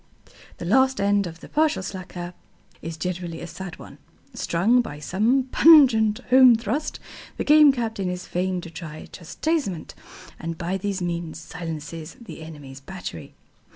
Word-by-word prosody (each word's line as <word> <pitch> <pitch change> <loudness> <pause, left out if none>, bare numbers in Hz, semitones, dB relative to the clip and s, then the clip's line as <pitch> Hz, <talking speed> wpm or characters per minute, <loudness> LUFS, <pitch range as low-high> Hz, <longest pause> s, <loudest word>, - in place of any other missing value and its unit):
The - - -6
last 260 +6 +3
end 200 -1 +2
of 165 0 -10
the - - -10
partial 305 -8 +1
slacker 180 -2 -7 0.5
is 165 0 -6
generally 175 0 -4
a - - -6
sad 180 0 -8
one. - - -13 0.3
Stung 215 +9 +2
by 150 -11 -7
some 215 - +1
pungent 245 -10 +6
home 255 -2 +8
thrust, 235 +7 -3 0.4
the - - -1
Game 300 -1 +7
Captain 225 -7 -3
is 180 0 -5
fain 180 0 -2
to 170 - -10
try 155 -2 -8
chastisement, 195 - -3 0.5
and 165 0 -5
by 175 +3 -2
these 195 -1 -2
means 170 -2 -4
silences 165 - -7
the 230 -8 -10
enemy's 145 -4 -10
battery. 140 - -8
185 Hz, 150 wpm, -24 LUFS, 165-235 Hz, 0.5 s, home